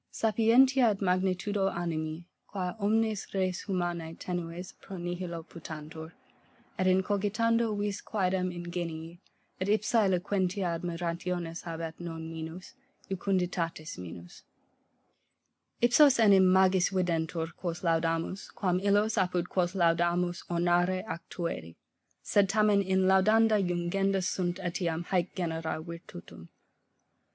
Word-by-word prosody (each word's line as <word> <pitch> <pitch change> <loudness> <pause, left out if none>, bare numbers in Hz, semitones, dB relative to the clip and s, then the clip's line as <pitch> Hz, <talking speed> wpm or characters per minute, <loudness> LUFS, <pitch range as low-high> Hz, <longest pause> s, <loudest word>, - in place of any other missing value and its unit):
Sapientia 235 +4 +4
et 200 -2 -1
magnitude 185 +1 0 0.2
animi, 160 -1 -3 0.2
qua 185 -3 -3
omnes 220 0 0
res 185 -2 0
humanae 175 -4 -2
tenues 175 0 -5
et - - -34
pro 195 - -8
nihilo 175 -1 -4
putantur, 160 0 -9 0.7
et 185 - +2
in 185 0 +4
cogitando 215 +3 +1
vis 205 -1 -2
quaedam 185 -3 0
ingenii, 170 -1 -5 0.4
et 185 - -2
ipsa 215 +2 +2
eloquentia 185 0 0
admirationis 170 0 -3
habet 165 -1 -4
non 165 -2 -6
minus, 160 +6 -7 0.4
jucunditatis 175 - -2
minus. 85 -1 -10 1.4
Ipsos 255 +4 +6
enim 195 -5 +6
magis 190 -1 +4
videntur, 165 -3 -1
quos 175 -1 -4
laudamus, 165 +2 0
quam 180 -2 +1
illos, 205 +2 +2
apud 180 -1 0
quos 180 0 0
laudamus 175 0 +2
ornare 175 +2 +2
ac 170 - -4
tueri: 170 - -4 0.5
sed 200 -2 +3
tamen 210 0 +4
in 190 -1 +1
laudenda 215 +3 +4
jungenda 185 +2 0
sunt 175 -1 -1
eliam 175 -2 -2
haec 180 -1 -1
genera 165 -3 -2
virtutum. 160 - -10
180 Hz, 115 wpm, -30 LUFS, 170-195 Hz, 1.4 s, Ipsos